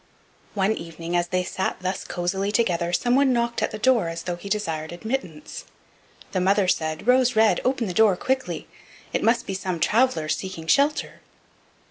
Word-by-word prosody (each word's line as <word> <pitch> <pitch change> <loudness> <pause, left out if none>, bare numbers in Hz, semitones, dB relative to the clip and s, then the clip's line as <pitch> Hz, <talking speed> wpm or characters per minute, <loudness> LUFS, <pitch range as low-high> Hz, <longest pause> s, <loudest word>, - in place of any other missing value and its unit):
One 195 +1 +2
evening 165 -1 -6
as 175 0 +1
they 180 +1 0
sat 190 +1 -3
thus 185 +1 -2
cosily 190 +3 -2
together 175 -6 +1
someone 255 +7 +3
knocked 235 0 0
at - - +1
the 215 - -6
door 230 -6 +2
as 165 0 -5
though 175 - -3
he 175 +3 -9
desired 165 -7 -2
admittance. 175 - -5 0.7
The 185 - 0
mother 195 +1 +3
said: 160 -1 -1
"Rose 250 0 +4
red, 220 0 +4
open 255 -2 0
the 185 - -3
door 215 -1 +5
quickly; 265 +5 -2 0.5
it - - 0
must 230 +2 +2
be 195 - -4
some 185 -2 -3
traveler 225 -6 +2
seeking 185 0 -3
shelter." 280 - +1
195 Hz, 170 wpm, -24 LUFS, 175-235 Hz, 0.7 s, door